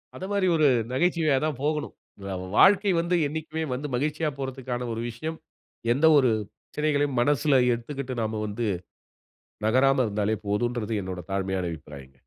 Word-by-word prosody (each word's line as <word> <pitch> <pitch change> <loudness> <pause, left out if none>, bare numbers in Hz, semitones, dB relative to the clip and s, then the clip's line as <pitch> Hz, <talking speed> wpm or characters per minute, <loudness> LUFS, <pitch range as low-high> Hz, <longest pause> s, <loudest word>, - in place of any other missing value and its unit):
அத - - -8
மாரி 200 -2 +2
ஒரு 155 -2 +4 0.2
நகைச்சுவையா 160 0 +2
தான் 145 -5 -2
போகணும். 150 0 -1 0.3
இந்த 100 -1 -5 0.2
வாழ்க்கை 200 0 +6
வந்து 170 +1 +1
என்னைக்குமே 160 +1 -4
வந்து 145 +4 -3
மகிழ்ச்சியா 150 +3 0
போறதுக்கான 130 -2 -4
ஒரு 115 - -4
விஷயம், 155 +8 -5 0.6
எந்த 145 +5 +2
ஒரு 130 -4 +4 0.2
பிரச்சனைகளையும் 145 -3 -1
மனசுல 145 0 +3
ஏத்துகிட்டு 130 +2 -5
நாம 110 0 -2
வந்து, 110 +2 -2 1.0
நகராம 130 +2 +4
இருந்தாலே 105 +1 0
போதுன்றது, 115 +2 -1
என்னோட 90 -1 -5
தாழ்மையான 95 -2 -1
அபிப்பிராயங்க. 70 -4 -12
130 Hz, 135 wpm, -26 LUFS, 110-155 Hz, 1.0 s, வாழ்க்கை